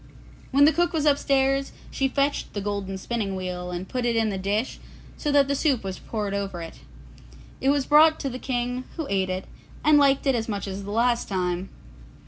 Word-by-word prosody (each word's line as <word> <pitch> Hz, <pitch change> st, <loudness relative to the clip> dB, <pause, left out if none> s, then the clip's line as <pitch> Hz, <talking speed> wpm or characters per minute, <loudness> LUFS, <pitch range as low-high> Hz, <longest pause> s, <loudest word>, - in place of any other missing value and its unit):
When 280 Hz, +2 st, +5 dB
the 310 Hz, -, +5 dB
cook 345 Hz, +3 st, +1 dB
was 310 Hz, -2 st, 0 dB
upstairs, 275 Hz, -1 st, +2 dB, 0.2 s
she 270 Hz, -, +1 dB
fetched 280 Hz, +2 st, -1 dB
the 205 Hz, -, -3 dB
golden 200 Hz, -1 st, -3 dB
spinning 200 Hz, -1 st, -3 dB
wheel 180 Hz, -1 st, -4 dB
and 180 Hz, +1 st, -5 dB
put 250 Hz, -1 st, -3 dB
it 240 Hz, -1 st, +1 dB
in 225 Hz, -1 st, +2 dB
the 195 Hz, -, -3 dB
dish 205 Hz, +6 st, -1 dB, 0.4 s
so 295 Hz, -, -2 dB
that 285 Hz, -1 st, +4 dB
the 280 Hz, -, +1 dB
soup 275 Hz, -5 st, +1 dB
was 190 Hz, -1 st, -5 dB
poured 210 Hz, -3 st, -4 dB
over 195 Hz, -3 st, -3 dB
it. 165 Hz, -1 st, -8 dB, 0.8 s
It 270 Hz, -, +2 dB
was 280 Hz, -1 st, +2 dB
brought 310 Hz, +2 st, +6 dB
to 275 Hz, -, -2 dB
the 255 Hz, -, -6 dB
King, 250 Hz, 0 st, -2 dB
who 320 Hz, -, -2 dB
ate 190 Hz, -1 st, +1 dB
it, 185 Hz, +1 st, -3 dB, 0.4 s
and 300 Hz, -1 st, +6 dB
liked 275 Hz, 0 st, +3 dB
it 270 Hz, -, +3 dB
as 230 Hz, -2 st, -2 dB
much 205 Hz, -1 st, -3 dB
as 195 Hz, 0 st, -5 dB
the -, -, -7 dB
last 235 Hz, +2 st, +1 dB
time. 180 Hz, -1 st, -1 dB
235 Hz, 210 wpm, -25 LUFS, 195-275 Hz, 0.8 s, brought